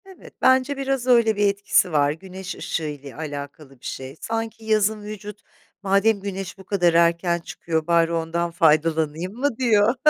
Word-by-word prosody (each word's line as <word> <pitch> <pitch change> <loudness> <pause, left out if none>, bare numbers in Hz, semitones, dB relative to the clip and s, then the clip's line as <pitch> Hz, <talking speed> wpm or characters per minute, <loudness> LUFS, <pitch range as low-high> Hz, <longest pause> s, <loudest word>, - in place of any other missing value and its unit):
Evet, 380 -2 -14
bence 260 +2 +3
biraz 270 -2 -2
öyle 235 -3 +4
bir 205 0 +3
etkisi 200 -2 +2
var 145 -2 +3
güneş 185 +3 -8
ışığı 165 - -3
ile 145 -2 -7
alakalı 145 -2 -8
bir - - -16
şey. 130 +1 -6
Sanki 225 0 -4
yazın 215 0 +2
vücut, 210 0 -8 0.4
"Madem 200 +2 +3
güneş 195 -2 -5
bu 190 - -12
kadar 180 -3 +2
erken 170 +1 +3
çıkıyor 160 -1 -3
bari 170 -1 +3
ondan 170 +1 -1
faydalanayım 160 +2 +1
mı?" 250 0 -1
diyor. 230 -2 +3
190 Hz, 160 wpm, -23 LUFS, 160-220 Hz, 0.4 s, öyle